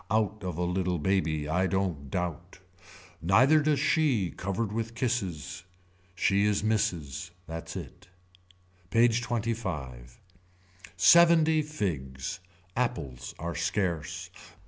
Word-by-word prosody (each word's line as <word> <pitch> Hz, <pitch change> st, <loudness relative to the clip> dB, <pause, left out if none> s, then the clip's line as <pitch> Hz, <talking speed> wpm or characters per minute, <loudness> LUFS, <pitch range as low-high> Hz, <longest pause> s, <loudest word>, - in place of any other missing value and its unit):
Out 110 Hz, -1 st, 0 dB
of 90 Hz, -3 st, -4 dB
a 90 Hz, -, 0 dB
little 90 Hz, 0 st, 0 dB
baby 80 Hz, -3 st, 0 dB
I 90 Hz, +4 st, +1 dB
don't 90 Hz, -8 st, -2 dB
doubt. 90 Hz, +2 st, -4 dB, 0.6 s
Neither 125 Hz, -, +5 dB
does 150 Hz, -2 st, +2 dB
she 135 Hz, -, +2 dB
covered 100 Hz, +3 st, -3 dB
with 115 Hz, +1 st, -3 dB
kisses. 95 Hz, -, -2 dB, 0.5 s
She 100 Hz, +2 st, +2 dB
is 105 Hz, -1 st, +1 dB
misses. 90 Hz, -7 st, -1 dB, 0.2 s
That's 80 Hz, +1 st, -7 dB
it. 90 Hz, +1 st, -8 dB, 0.8 s
PAGE 115 Hz, +3 st, +4 dB
XXV. 90 Hz, -, -4 dB, 0.8 s
Seventy 165 Hz, -2 st, +6 dB
figs. 85 Hz, -, -4 dB, 0.4 s
Apples 70 Hz, -, -3 dB
are 85 Hz, +1 st, -4 dB
scarce. 85 Hz, 0 st, -2 dB
95 Hz, 105 wpm, -29 LUFS, 85-115 Hz, 0.8 s, Seventy